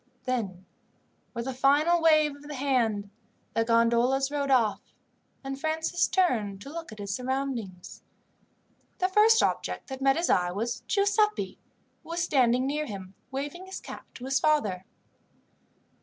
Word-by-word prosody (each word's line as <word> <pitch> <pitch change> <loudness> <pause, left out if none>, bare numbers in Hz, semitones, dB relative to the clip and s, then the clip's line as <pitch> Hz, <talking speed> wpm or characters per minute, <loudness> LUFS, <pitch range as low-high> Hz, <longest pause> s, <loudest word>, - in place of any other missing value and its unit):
Then, 200 -8 -3 0.7
with 235 0 -3
a 265 - -2
final 290 +6 +3
wave 310 -3 +4
of 285 - -16
the 295 - -6
hand, 230 -7 0 0.4
the 225 - +2
gondolas 235 +4 +2
rowed 285 -1 -1
off 235 -6 +3 0.6
and 270 0 -5
Francis 320 +2 0
turned 225 - +1
to 275 - -9
look 335 -3 -7
at 215 - -10
his 200 -1 -4
surroundings. 250 -8 -4 1.0
The 370 - +1
first 435 +3 +5
object - - -2
that 265 0 -6
met 270 +1 +3
his 340 - 0
eye 180 -1 +2
was 230 +5 -3
Giuseppi, 420 +1 +1 0.4
who - - -17
was 340 0 -1
standing 255 -5 +3
near 300 +2 -1
him 195 -4 -8 0.2
waving 290 +7 -5
his 380 - -6
cap - - -10
to 250 - -8
his 270 0 +1
father. 210 -13 +1
270 Hz, 150 wpm, -28 LUFS, 230-310 Hz, 1.0 s, first